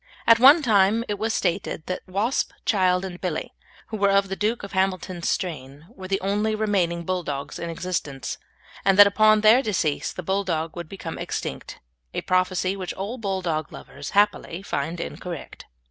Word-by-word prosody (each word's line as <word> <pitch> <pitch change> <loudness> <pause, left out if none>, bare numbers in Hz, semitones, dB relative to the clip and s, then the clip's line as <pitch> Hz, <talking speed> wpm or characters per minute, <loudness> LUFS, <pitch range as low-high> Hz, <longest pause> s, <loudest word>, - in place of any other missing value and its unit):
At 230 0 +6
one 285 +6 +8
time 215 -1 +3
it 205 -1 -3
was 220 +1 0
stated 170 -5 -1
that 185 - -4
Wasp, 205 +7 -1
Child, 185 -3 +2
and 180 -2 -8
Billy, 180 -4 -3 0.4
who 220 - -4
were 200 -1 +3
of 195 0 +3
the 195 - -2
Duke 215 +3 -1
of 200 - -7
Hamilton's 185 -2 -1
strain, 150 -5 -4
were 190 -5 -9
the 195 +1 0
only 210 +3 0
remaining 190 -6 0
Bulldogs 165 -6 -3
in 170 - -4
existence, 165 -5 -4 0.4
and 195 0 +3
that 205 - +11
upon 215 +1 +4
their 220 +4 +6
decease 180 - -1
the 185 - -7
Bulldog 170 -4 -1
would 170 -3 -7
become 170 -4 -7
extinct - - -5 0.4
a - - -1
prophecy 185 +1 +1
which 185 -2 -5
all 210 +7 -5
Bulldog 180 -7 -2
lovers 140 0 -9
happily 205 -3 +1
find 165 -1 -3
incorrect. 175 -1 -7
190 Hz, 170 wpm, -24 LUFS, 170-205 Hz, 0.4 s, that